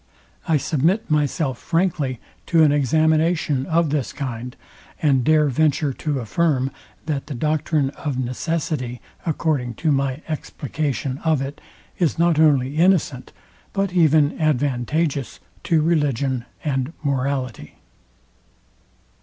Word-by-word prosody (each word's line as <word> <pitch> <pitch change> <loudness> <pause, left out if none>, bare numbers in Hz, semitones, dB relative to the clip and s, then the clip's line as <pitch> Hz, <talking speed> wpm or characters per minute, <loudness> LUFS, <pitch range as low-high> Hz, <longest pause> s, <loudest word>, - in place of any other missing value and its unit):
I 160 -2 +3
submit 160 +7 0
myself 145 -3 0
frankly 165 -8 0 0.3
to 165 -2 +5
an 150 - +5
examination 155 0 +2
of 165 -2 +2
this 145 -4 -1
kind, 125 -2 -5 0.4
and 135 -5 +3
dare 155 +2 +4
venture 145 0 +1
to 150 +1 -2
affirm, 135 +2 0 0.3
that 145 -3 -3
the 145 - -5
doctrine 150 0 0
of 145 -3 -4
necessity, 130 -1 -2 0.3
according 145 -7 0
to 160 +5 0
my 135 +1 0
explication 145 -2 -3
of 160 -3 +1
it, 135 +2 -5 0.4
is 170 -5 +1
not 170 -2 +3
only 145 -2 +3
innocent, 165 -7 +2 0.4
but 195 -2 -1
even 155 -4 +3
advantageous 145 -1 0 0.3
to 160 -2 +3
religion 140 -6 0 0.2
and 135 +1 -1
morality. 135 -3 -2
145 Hz, 115 wpm, -22 LUFS, 130-160 Hz, 0.4 s, to